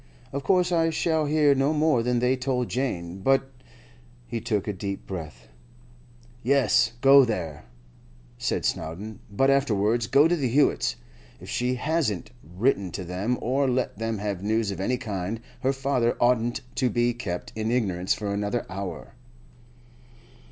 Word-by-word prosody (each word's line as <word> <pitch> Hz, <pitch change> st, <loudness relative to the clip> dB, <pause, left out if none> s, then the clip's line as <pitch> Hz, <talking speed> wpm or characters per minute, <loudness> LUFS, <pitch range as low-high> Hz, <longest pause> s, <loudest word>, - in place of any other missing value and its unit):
Of 140 Hz, 0 st, -3 dB
course 180 Hz, +3 st, +2 dB
I 165 Hz, -1 st, +3 dB
shall 160 Hz, -1 st, 0 dB
hear 150 Hz, -1 st, +4 dB
no 135 Hz, +3 st, +1 dB
more 150 Hz, -5 st, +3 dB
than 125 Hz, +1 st, 0 dB
they 125 Hz, +2 st, +2 dB
told 125 Hz, -1 st, -1 dB
Jane; 95 Hz, -9 st, -3 dB
but—' 135 Hz, +5 st, +2 dB, 0.7 s
He 115 Hz, -1 st, -4 dB
took 110 Hz, -4 st, -1 dB
a 105 Hz, -, -1 dB
deep 100 Hz, +1 st, -5 dB
breath. 75 Hz, -10 st, -7 dB, 0.9 s
'Yes, 125 Hz, -2 st, +3 dB
go 135 Hz, +1 st, +8 dB
there,' 90 Hz, -, -3 dB, 0.7 s
said -, -, -1 dB
Snowdon; 100 Hz, +7 st, -3 dB
'but 135 Hz, +7 st, +2 dB
afterwards 115 Hz, -4 st, +1 dB
go 145 Hz, +6 st, +5 dB
to 175 Hz, -, +2 dB
the 140 Hz, -6 st, 0 dB
Hewetts'. 140 Hz, +4 st, +2 dB, 0.4 s
If -, -, -11 dB
she 125 Hz, +1 st, 0 dB
hasn't 140 Hz, -, -1 dB
written 95 Hz, -, 0 dB
to 95 Hz, -, -4 dB
them, 95 Hz, +8 st, -2 dB
or 135 Hz, +3 st, +1 dB
let 125 Hz, -2 st, -1 dB
them 115 Hz, -1 st, -2 dB
have 100 Hz, -2 st, -3 dB
news 110 Hz, 0 st, 0 dB
of 95 Hz, -, -6 dB
any 125 Hz, +6 st, 0 dB
kind, 105 Hz, -3 st, -4 dB, 0.2 s
her 130 Hz, -, +1 dB
father 135 Hz, -3 st, 0 dB
oughtn't 120 Hz, -1 st, +2 dB, 0.2 s
to 130 Hz, -, +2 dB
be 120 Hz, +2 st, +1 dB
kept 90 Hz, -7 st, -5 dB
in 110 Hz, 0 st, -2 dB
ignorance 95 Hz, -7 st, 0 dB
for 100 Hz, -1 st, -3 dB
another 105 Hz, +4 st, -2 dB
hour. 95 Hz, +2 st, -6 dB
120 Hz, 155 wpm, -26 LUFS, 100-135 Hz, 0.9 s, go